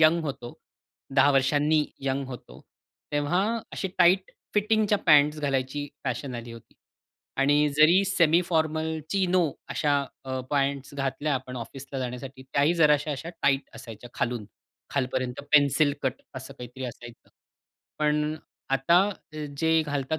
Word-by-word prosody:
Young 165 Hz, +2 st, +5 dB
होतो. 125 Hz, -4 st, -6 dB, 0.6 s
10 140 Hz, +2 st, +6 dB
वर्षांनी 145 Hz, +3 st, +3 dB, 0.2 s
young 135 Hz, 0 st, -1 dB
होतो. 125 Hz, -2 st, -10 dB, 0.5 s
तेव्हा 145 Hz, +5 st, +1 dB, 0.3 s
अशी 190 Hz, -, -3 dB
टाईट 185 Hz, +2 st, +4 dB, 0.2 s
फिटिंगच्या 210 Hz, 0 st, +2 dB
पँट्स 150 Hz, 0 st, +5 dB
घालायची 140 Hz, +1 st, -1 dB, 0.2 s
फॅशन 125 Hz, 0 st, -3 dB
आली 120 Hz, 0 st, -7 dB
होती 115 Hz, -, -14 dB, 0.7 s
आणि 145 Hz, +2 st, +4 dB
जरी 170 Hz, +6 st, +6 dB
सेमी 170 Hz, -3 st, +3 dB
फॉर्मल 160 Hz, -1 st, 0 dB
चिनो 185 Hz, -3 st, +2 dB
अ, -, -, -19 dB
अशा 145 Hz, -1 st, +1 dB, 0.5 s
पँट्स 140 Hz, -1 st, -1 dB
घातल्या 140 Hz, +2 st, -1 dB
आपण 130 Hz, -1 st, -5 dB
ऑफिसला 135 Hz, +3 st, -7 dB
जाण्यासाठी 130 Hz, +1 st, -6 dB
त्याही 140 Hz, +5 st, +1 dB
जराश्या 150 Hz, 0 st, +4 dB
अशा 145 Hz, +4 st, -6 dB
टाईट 135 Hz, 0 st, +1 dB
असायच्या 115 Hz, 0 st, -10 dB
खालून. 120 Hz, -3 st, -2 dB, 0.5 s
खालपर्यंत 130 Hz, -2 st, -2 dB
पेन्सिल 145 Hz, 0 st, +4 dB
कट 130 Hz, 0 st, -2 dB
असं 130 Hz, +1 st, -8 dB
काहीतरी 125 Hz, +2 st, -8 dB
असायचं. 120 Hz, -1 st, -10 dB, 0.7 s
पण 150 Hz, 0 st, +1 dB, 0.4 s
आता 150 Hz, +6 st, +4 dB, 0.6 s
जे 160 Hz, +1 st, +3 dB
घालतात 145 Hz, +1 st, -2 dB
145 Hz, 130 wpm, -26 LUFS, 130-155 Hz, 0.7 s, 10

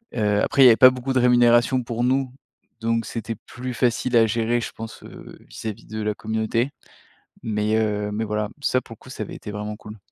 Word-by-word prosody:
heu, 105 Hz, -2 st, +1 dB
après 140 Hz, -, +4 dB
il -, -, +9 dB
y -, -, +10 dB
avait 115 Hz, -, +7 dB
pas 130 Hz, -, +9 dB
beaucoup 130 Hz, +1 st, -3 dB
de 130 Hz, -, +3 dB
rémunération 120 Hz, +1 st, +4 dB
pour 120 Hz, 0 st, -3 dB
nous, 130 Hz, 0 st, 0 dB, 0.5 s
donc 115 Hz, 0 st, 0 dB
c'était 115 Hz, 0 st, -4 dB
plus 125 Hz, +1 st, -6 dB
facile 125 Hz, 0 st, 0 dB
à 115 Hz, -1 st, +5 dB
gérer, 115 Hz, +2 st, 0 dB
je -, -, -5 dB
pense, 115 Hz, 0 st, -9 dB
heu, -, -, -12 dB
vis-à-vis 110 Hz, 0 st, -7 dB
de 110 Hz, 0 st, -5 dB
la 105 Hz, 0 st, -1 dB
communauté, 110 Hz, +5 st, -1 dB, 0.7 s
mais, 105 Hz, 0 st, 0 dB
heu, 105 Hz, -1 st, 0 dB
mais 110 Hz, +2 st, -2 dB
voilà. 105 Hz, 0 st, -2 dB
Ça, 130 Hz, -, +2 dB
pour 115 Hz, -, -11 dB
le -, -, -24 dB
coup, -, -, -16 dB
ça 110 Hz, -, -6 dB
avait -, -, -9 dB
été -, -, -8 dB
vraiment 105 Hz, +1 st, -5 dB
cool. 105 Hz, 0 st, -11 dB
115 Hz, 220 wpm, -23 LUFS, 105-125 Hz, 0.7 s, y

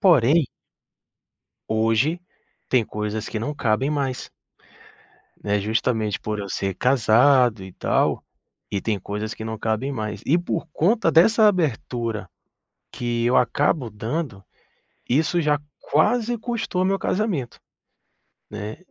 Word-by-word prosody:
Porém 160 Hz, -, +5 dB, 1.2 s
hoje, 115 Hz, +10 st, +1 dB, 0.5 s
tem 125 Hz, -4 st, +3 dB
coisas 105 Hz, +1 st, -4 dB
que 110 Hz, -, -4 dB
não 145 Hz, +7 st, -3 dB
cabem 130 Hz, +2 st, 0 dB
mais. 135 Hz, -4 st, -2 dB, 1.1 s
Né, 105 Hz, 0 st, +1 dB
justamente 110 Hz, 0 st, 0 dB
por 105 Hz, -1 st, -3 dB
eu 100 Hz, -1 st, -5 dB
ser 95 Hz, 0 st, -2 dB
casado 125 Hz, -1 st, +4 dB
e 95 Hz, -, -9 dB
tal, -, -, 0 dB, 0.5 s
e 100 Hz, -, -1 dB
tem 105 Hz, -3 st, -1 dB
coisas 105 Hz, +3 st, -4 dB
que 110 Hz, -, -8 dB
não 110 Hz, 0 st, -4 dB
cabem 110 Hz, +5 st, -1 dB
mais. 110 Hz, -5 st, -4 dB
E 165 Hz, +5 st, +4 dB
por 170 Hz, -1 st, -2 dB
conta 190 Hz, 0 st, +2 dB
dessa 215 Hz, +7 st, +6 dB
abertura, 120 Hz, -, -1 dB, 0.6 s
que 120 Hz, -1 st, -2 dB
eu 125 Hz, -, +3 dB
acabo 125 Hz, +2 st, +2 dB
dando, 110 Hz, 0 st, -4 dB, 0.7 s
isso 160 Hz, +6 st, +2 dB
já 150 Hz, -2 st, +2 dB, 0.2 s
quase 235 Hz, +10 st, +1 dB
custou 225 Hz, -5 st, -2 dB
meu 195 Hz, +1 st, +1 dB
casamento, 185 Hz, -, -2 dB, 0.9 s
né. 105 Hz, +1 st, -6 dB
120 Hz, 125 wpm, -23 LUFS, 110-160 Hz, 1.2 s, dessa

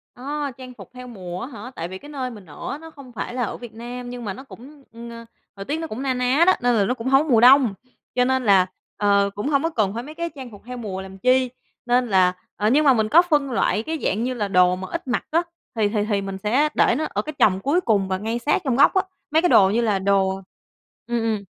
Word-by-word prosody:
Ờ, 285 Hz, +2 st, -4 dB
trang 255 Hz, -1 st, -10 dB
phục 195 Hz, -7 st, -13 dB
theo 250 Hz, 0 st, -10 dB
mùa 185 Hz, -6 st, -7 dB
á -, -, -5 dB
hả? 245 Hz, -1 st, -9 dB
Tại 165 Hz, +1 st, -4 dB
vì 190 Hz, +1 st, -7 dB
cái 290 Hz, -, -13 dB
nơi 265 Hz, -3 st, -4 dB
mình 210 Hz, -5 st, -11 dB
ở 145 Hz, -2 st, -8 dB
á 280 Hz, -, -4 dB
nó 325 Hz, +1 st, -12 dB
không 275 Hz, -4 st, -13 dB
phải 240 Hz, -, -5 dB
là 250 Hz, -1 st, -1 dB
ở -, -, -4 dB
Việt 240 Hz, -3 st, -10 dB
Nam, 245 Hz, +2 st, -7 dB
nhưng 245 Hz, -2 st, -7 dB
mà 195 Hz, -, -3 dB
nó 265 Hz, -, -10 dB
cũng, 275 Hz, +2 st, -14 dB
ừm, 235 Hz, +1 st, -10 dB
ờ, 230 Hz, 0 st, -10 dB, 0.3 s
thời 195 Hz, 0 st, -8 dB
tiết 300 Hz, -, -2 dB
nó 325 Hz, -, -4 dB
cũng 225 Hz, +5 st, -6 dB
na 265 Hz, -2 st, 0 dB
ná 250 Hz, +5 st, +2 dB
đó, 370 Hz, -, +7 dB
nên 245 Hz, -1 st, +2 dB
là 200 Hz, -2 st, +3 dB
nó 250 Hz, -, 0 dB
cũng 245 Hz, 0 st, -6 dB
hông 270 Hz, +2 st, +5 dB
có 315 Hz, -, -7 dB
mùa 230 Hz, -3 st, +5 dB
đông, 255 Hz, -4 st, +7 dB, 0.4 s
cho 250 Hz, 0 st, +3 dB
nên 260 Hz, 0 st, +1 dB
là, 190 Hz, -3 st, +5 dB, 0.3 s
ờ, 200 Hz, -1 st, +3 dB
cũng 205 Hz, +7 st, -3 dB
hông 280 Hz, 0 st, +2 dB
có 330 Hz, -, +1 dB
cần 215 Hz, -9 st, 0 dB
phải 235 Hz, +2 st, -4 dB
mấy 305 Hz, +3 st, -10 dB
cái 340 Hz, 0 st, -3 dB
trang 260 Hz, -4 st, -9 dB
phục 205 Hz, -, -13 dB
theo 250 Hz, 0 st, -7 dB
mùa 195 Hz, -5 st, -5 dB
làm 190 Hz, 0 st, -10 dB
chi. 255 Hz, +3 st, +2 dB, 0.4 s
Nên 245 Hz, 0 st, +2 dB
là 185 Hz, -3 st, +3 dB, 0.2 s
ờ, 210 Hz, +1 st, +1 dB
nhưng 300 Hz, +4 st, +3 dB
mà 270 Hz, -, +7 dB
mình 220 Hz, -2 st, 0 dB
có 340 Hz, -, +7 dB
phân 295 Hz, -6 st, 0 dB
loại 215 Hz, -2 st, +1 dB
cái 320 Hz, +3 st, -3 dB
dạng 220 Hz, +4 st, 0 dB
như 255 Hz, +1 st, -1 dB
là 210 Hz, -4 st, -2 dB
đồ 180 Hz, -1 st, +4 dB
mà 190 Hz, 0 st, -7 dB
ít -, -, -5 dB
mặc 245 Hz, -, -1 dB
á, 335 Hz, +2 st, +3 dB, 0.3 s
thì 210 Hz, -2 st, +1 dB
thì 210 Hz, -1 st, 0 dB
thì 200 Hz, -1 st, +1 dB
mình 195 Hz, -1 st, -5 dB
sẽ 250 Hz, +10 st, +1 dB
để 235 Hz, -, +3 dB
nó 310 Hz, -, -1 dB
ở -, -, -2 dB
cái 305 Hz, -, -7 dB
chồng 190 Hz, -2 st, +4 dB
cuối 295 Hz, -, +1 dB
cùng 205 Hz, -, +1 dB
và 190 Hz, 0 st, -1 dB
ngay 225 Hz, +4 st, -3 dB
sát 295 Hz, +8 st, +1 dB
trong 255 Hz, -3 st, +1 dB
góc 280 Hz, -, +5 dB
á, 380 Hz, -, +3 dB, 0.3 s
mấy 320 Hz, +1 st, +4 dB
cái 355 Hz, -, +2 dB
đồ 190 Hz, -1 st, +6 dB
như 230 Hz, +4 st, +1 dB
là 210 Hz, -4 st, +1 dB
đồ 195 Hz, 0 st, +1 dB, 0.7 s
ừm, 240 Hz, -1 st, -1 dB
ừm. 220 Hz, -3 st, -1 dB
240 Hz, 285 wpm, -22 LUFS, 200-270 Hz, 0.7 s, đó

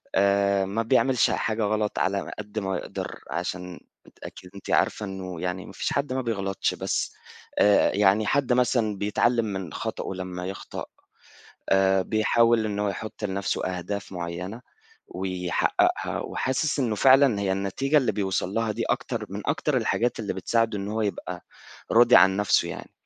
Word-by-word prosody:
آآ، 100 Hz, 0 st, +3 dB
ما 100 Hz, +4 st, -1 dB
بيعملش 130 Hz, +1 st, +3 dB
حاجة 110 Hz, 0 st, -1 dB
غلط 105 Hz, 0 st, 0 dB
على 100 Hz, +1 st, -1 dB
قدر 105 Hz, +1 st, -5 dB
ما 95 Hz, -1 st, -1 dB
يقدر، -, -, -6 dB
عشان 90 Hz, 0 st, -4 dB, 0.4 s
أكيد 90 Hz, -, -10 dB
أنت 100 Hz, -, -10 dB
عارفة 105 Hz, -, +1 dB
إنه 95 Hz, -3 st, -6 dB
يعني 90 Hz, +1 st, -3 dB
ما -, -, -10 dB
فيش -, -, -2 dB
حد 140 Hz, -2 st, -1 dB
ما 130 Hz, -, -1 dB
بيغلطش، 100 Hz, -5 st, -1 dB
بس -, -, -2 dB, 0.5 s
آآ، 105 Hz, -1 st, +5 dB
يعني 105 Hz, +1 st, +4 dB
حد 135 Hz, -3 st, +2 dB
مثلًا 120 Hz, -4 st, +1 dB
بيتعلَّم 115 Hz, +3 st, +1 dB
من 95 Hz, -6 st, -5 dB
خطأه -, -, -4 dB
لمّا 90 Hz, -1 st, -5 dB
يخطأ. 95 Hz, +1 st, -6 dB, 0.9 s
آآ، 95 Hz, 0 st, +4 dB
بيحاول 115 Hz, +2 st, +3 dB
إنه 105 Hz, -1 st, -2 dB
هو -, -, +1 dB
يحُط 110 Hz, +2 st, -7 dB
لنفسه 100 Hz, 0 st, -2 dB
أهداف 100 Hz, +2 st, -5 dB
معيَّنة 90 Hz, +6 st, -5 dB, 0.5 s
ويحقِّقها، 90 Hz, -1 st, 0 dB
وحاسس 130 Hz, +4 st, -1 dB
إنه 120 Hz, -5 st, 0 dB
فعلًا 130 Hz, -1 st, +5 dB
هي 95 Hz, -2 st, 0 dB
النتيجة 100 Hz, +10 st, 0 dB
اللي 130 Hz, -6 st, +1 dB
بيوصل 95 Hz, -1 st, -1 dB
لها 115 Hz, -1 st, 0 dB
دي، -, -, -2 dB
أكتر -, -, -2 dB
من -, -, -5 dB
أكتر -, -, 0 dB
الحاجات 120 Hz, 0 st, 0 dB
اللي 105 Hz, -, -2 dB
بتساعده 115 Hz, +2 st, 0 dB
إن 100 Hz, +1 st, -4 dB
هو 110 Hz, +1 st, -1 dB
يبقى 90 Hz, -3 st, -4 dB, 0.5 s
راضي 120 Hz, +1 st, +7 dB
عن 95 Hz, +2 st, +6 dB
نفسه 105 Hz, -1 st, +2 dB
يعني. -, -, -8 dB
100 Hz, 160 wpm, -25 LUFS, 95-115 Hz, 0.9 s, راضي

